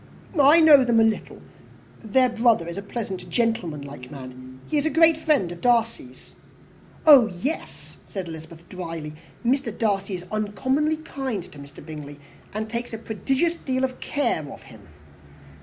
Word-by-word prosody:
"I 290 Hz, +5 st, +7 dB
know 295 Hz, -4 st, +8 dB
them 240 Hz, -2 st, +3 dB
a -, -, +6 dB
little. 225 Hz, -1 st, -1 dB, 0.6 s
Their 250 Hz, +3 st, +2 dB
brother 230 Hz, -7 st, +2 dB
is 170 Hz, -, -5 dB
a 200 Hz, -, -4 dB
pleasant, 200 Hz, -2 st, -6 dB
gentlemanlike 150 Hz, -, -2 dB
man 130 Hz, -1 st, -10 dB
he 300 Hz, -, +1 dB
is 290 Hz, -, 0 dB
a -, -, +2 dB
great 325 Hz, +1 st, +5 dB
friend 300 Hz, -, +1 dB
of 175 Hz, -, -9 dB
Darcy's." 230 Hz, -, -1 dB, 0.7 s
"Oh 280 Hz, -7 st, +8 dB
yes," 225 Hz, -, -6 dB
said 190 Hz, -3 st, -5 dB
Elizabeth 160 Hz, +1 st, -10 dB
drily 165 Hz, -4 st, -6 dB, 0.3 s
"Mr. 250 Hz, -1 st, +1 dB
Darcy 200 Hz, -3 st, 0 dB
is 180 Hz, 0 st, -8 dB
uncommonly 260 Hz, +9 st, 0 dB
kind 265 Hz, -, -4 dB
to 145 Hz, -, -13 dB
Mr. 140 Hz, +1 st, -12 dB
Bingley, 150 Hz, -2 st, -9 dB, 0.3 s
and 215 Hz, +1 st, -4 dB
takes 235 Hz, +1 st, -5 dB
a -, -, -3 dB
prodigious 265 Hz, -, -1 dB
deal 260 Hz, -6 st, -3 dB
of 255 Hz, -1 st, -2 dB
care 285 Hz, -, -1 dB
of -, -, -11 dB
him." 110 Hz, -6 st, -15 dB
220 Hz, 155 wpm, -24 LUFS, 165-260 Hz, 0.7 s, know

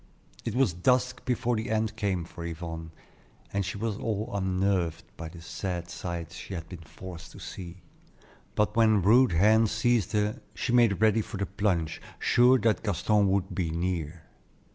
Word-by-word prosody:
It 115 Hz, -, -2 dB
was 125 Hz, -8 st, +3 dB
dusk 125 Hz, +7 st, +1 dB
before 120 Hz, -1 st, 0 dB
the 110 Hz, 0 st, -3 dB
end 110 Hz, -1 st, 0 dB
came 95 Hz, -5 st, -1 dB
for 85 Hz, -, -9 dB
Yvonne, 80 Hz, -1 st, -5 dB, 0.6 s
and 100 Hz, 0 st, +1 dB
she 95 Hz, +2 st, -4 dB
was 110 Hz, -1 st, -2 dB
all 110 Hz, -1 st, -2 dB
unnerved 95 Hz, -3 st, 0 dB
by 80 Hz, -1 st, -7 dB
the 85 Hz, +1 st, -12 dB
sad 90 Hz, -1 st, -4 dB
sights 85 Hz, -1 st, -5 dB
she 95 Hz, -, -7 dB
had 80 Hz, -2 st, -6 dB
been 90 Hz, -3 st, -9 dB
forced 85 Hz, +1 st, -10 dB
to -, -, -11 dB
see; 90 Hz, 0 st, -8 dB, 0.7 s
but 105 Hz, -, +1 dB
when 110 Hz, -4 st, +4 dB
rude 120 Hz, +3 st, +5 dB
hands 110 Hz, +5 st, +4 dB
seized 115 Hz, -2 st, +1 dB
her, 105 Hz, +4 st, 0 dB
she 120 Hz, -, -2 dB
made 115 Hz, -5 st, +4 dB
ready 110 Hz, 0 st, +4 dB
for 105 Hz, -, -6 dB
the 100 Hz, -, -1 dB
plunge, 90 Hz, -4 st, -1 dB, 0.2 s
sure 125 Hz, +2 st, +5 dB
that 115 Hz, -4 st, +1 dB
Gaston 105 Hz, 0 st, +2 dB
would 95 Hz, 0 st, 0 dB
"be 90 Hz, -4 st, -1 dB
near." 85 Hz, -1 st, -3 dB
100 Hz, 170 wpm, -28 LUFS, 85-110 Hz, 0.7 s, rude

